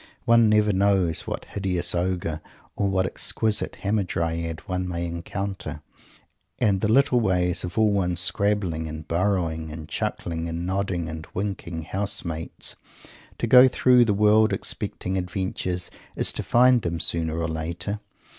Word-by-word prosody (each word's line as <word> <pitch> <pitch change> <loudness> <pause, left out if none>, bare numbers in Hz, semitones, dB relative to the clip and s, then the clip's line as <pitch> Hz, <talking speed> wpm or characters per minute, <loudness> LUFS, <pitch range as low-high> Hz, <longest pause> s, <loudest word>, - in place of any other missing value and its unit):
One 115 -1 +5
never 105 -1 +3
knows 95 -4 +1
what - - -4
hideous 95 -3 -1
ogre 85 -3 -1 0.3
or 100 - 0
what 95 -1 +1
exquisite 110 +3 -1
hamadryad 85 -5 -1
one 90 0 -3
may 85 -1 -3
encounter. 85 -2 -5 0.8
And 95 -3 +2
the 105 - +1
little 135 0 +4
ways 90 -5 +1
of 90 +3 -6
all 110 -1 +4
one's 90 -3 0
scrabbling 90 -3 0
and 80 0 -7
burrowing 85 -3 0
and 75 0 -8
chuckling 85 0 -3
and 85 +1 -4
nodding 95 -2 -1
and 80 -1 -7
winking 90 -4 -3
house 100 +5 -2
mates! 80 -1 -5 0.6
To - - -1
go 125 +2 +8
through 125 -1 +4
the 105 -3 +1
world 105 +1 +4
expecting 95 +1 -3
adventures 90 -1 -3 0.2
is - - +1
to - - -2
find 125 0 +4
them 85 -3 -2
sooner 80 -1 0
or 85 0 -1
later. 85 +5 -3
90 Hz, 145 wpm, -25 LUFS, 85-105 Hz, 0.8 s, go